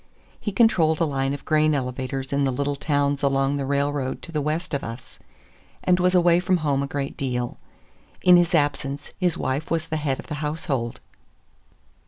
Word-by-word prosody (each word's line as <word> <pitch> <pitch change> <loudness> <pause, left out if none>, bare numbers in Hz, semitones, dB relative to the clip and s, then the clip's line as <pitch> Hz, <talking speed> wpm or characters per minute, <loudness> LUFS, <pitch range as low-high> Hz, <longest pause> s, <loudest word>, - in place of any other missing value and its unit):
He 210 - -3
controlled 170 -9 +3
a 165 - +3
line 135 -2 -1
of 140 -1 -6
grain 155 -1 +3
elevators 130 +1 -3
in 140 0 +2
the 135 - +2
little 140 +2 -1
towns 145 -1 0
along 135 0 +1
the 135 -1 -3
railroad 140 -1 -1
to 170 - -8
the 155 -2 -1
west 155 +4 -2
of 140 - -1
us, 115 +2 -8 0.6
and 180 0 +3
was 180 +1 +3
away 175 -1 +5
from 185 0 +2
home 140 -2 +2
a 140 - -2
great 140 0 -3
deal. 125 -3 -3 0.6
In 180 -1 +8
his 175 0 +4
absence 145 -1 -1
his 175 -3 +1
wife 135 +4 -2
was 165 0 -1
the 160 - -1
head 145 -3 -1
of - - -8
the - - -6
household. 150 -6 -2
145 Hz, 190 wpm, -24 LUFS, 135-165 Hz, 0.6 s, In